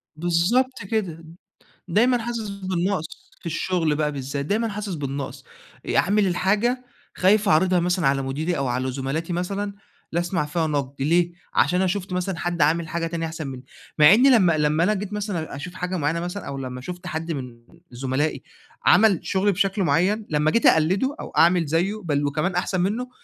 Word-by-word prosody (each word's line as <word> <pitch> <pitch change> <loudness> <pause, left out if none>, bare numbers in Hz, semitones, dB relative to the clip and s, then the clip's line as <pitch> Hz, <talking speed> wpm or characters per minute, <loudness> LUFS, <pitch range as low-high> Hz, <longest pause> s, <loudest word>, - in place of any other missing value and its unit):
بالضبط 175 +11 +1
كده، 185 -8 -2 0.7
دايمًا 240 +8 +3
حاسس 230 -2 -4
بالنقص 185 -4 -3
في - - -14
الشغل 170 -1 0
بقى 150 -1 0
بالذات 140 0 -4
دايمًا 220 +6 0
حاسس 205 -2 -4
بالنقص، 140 -2 -5 0.4
آآ - - -1
أعمل 205 +2 +3
الحاجة 210 +8 +1 0.3
خايف 205 +2 +3
أعرضها 180 +1 +4
مثلًا 175 -1 0
على 135 0 +2
مديري 155 +6 -2
أو 135 - -1
على 130 +1 -1
زملاتي 140 +6 -3
مثلًا 195 +3 -3 0.4
لأسمع 170 0 0
فيها 160 +2 -1
نقد 140 -2 -3
ليه، 170 +4 +2 0.2
عشان 180 - +3
أنا 190 - +2
شفت 185 0 -2
مثلًا 180 0 -2
حد 175 -2 -1
عامل 160 +2 +2
حاجة 170 0 -2
تانية 165 0 -3
أحسن 160 -1 -5
مني، 130 -1 -7 0.3
مع 150 +5 +8
إني 250 +5 +5
لمّا 180 -10 +4
لمّا 150 +2 +2
أنا 210 +4 +2
جيت 200 0 -5
مثلًا 200 -8 -3
أشوف 175 +6 -7
حاجة 180 0 -3
معينة 160 +1 0
مثلًا 180 +4 -5
أو 140 -1 -5
لما 125 -1 -6
شُفت 180 +6 -8
حد 160 +1 -3
من 125 -5 -7 0.3
زملائي 130 +4 -2 0.4
عمل 205 -5 +5
شغل 200 +1 +1
بشكل 195 +1 0
معين، 195 +5 +1
لما 150 0 +2
جيت 230 - +2
أقلده 190 - +3
أو - - -7
أعمل 170 0 +5
زيّه، 180 +8 0
بل 145 -3 0
وكمان 155 +6 -1
أحسن 180 +1 0
منه، 220 +8 -1
175 Hz, 180 wpm, -23 LUFS, 150-195 Hz, 0.7 s, مع